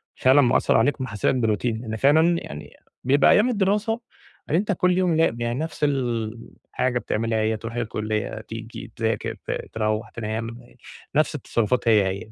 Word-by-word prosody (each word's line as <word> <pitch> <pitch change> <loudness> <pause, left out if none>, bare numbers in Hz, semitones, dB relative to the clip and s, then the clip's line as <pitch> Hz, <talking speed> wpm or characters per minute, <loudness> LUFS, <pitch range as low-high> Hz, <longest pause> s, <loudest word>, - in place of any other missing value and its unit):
فعلًا 135 +3 +5
مأثّر 120 - +3
عليك، 135 +4 +1
محسّسك 110 +1 0
بroutine، 115 0 0
إن 110 0 -4
فعلًا 160 +7 +4
يعني 75 0 -9 0.3
بيبقى 135 +2 +4
أيام 230 +5 +4
الدراسة، 210 +2 0 0.5
يعني 165 - +2
أنتَ 210 0 -1
كل 180 -1 +2
يوم 180 -3 +2
ل 120 -8 +1
يعني 120 +3 -1
نفس 160 -1 -5
الحاجة 120 -1 -2
بتعملها، 110 0 -1
هي: 110 0 0
ترُوح 115 +2 -7
الكُلّية، 110 -2 -3
تيجي، 115 +1 -9
تذاكر، 110 -2 -1
ت - - -1 0.2
تروِّح، 110 0 -1
تنام، 115 +1 -4 0.6
نفس 155 +1 +2
التصرفات 120 -2 -1
هي 105 -4 +5
هي. 100 +3 -6
120 Hz, 155 wpm, -24 LUFS, 110-145 Hz, 0.6 s, فعلًا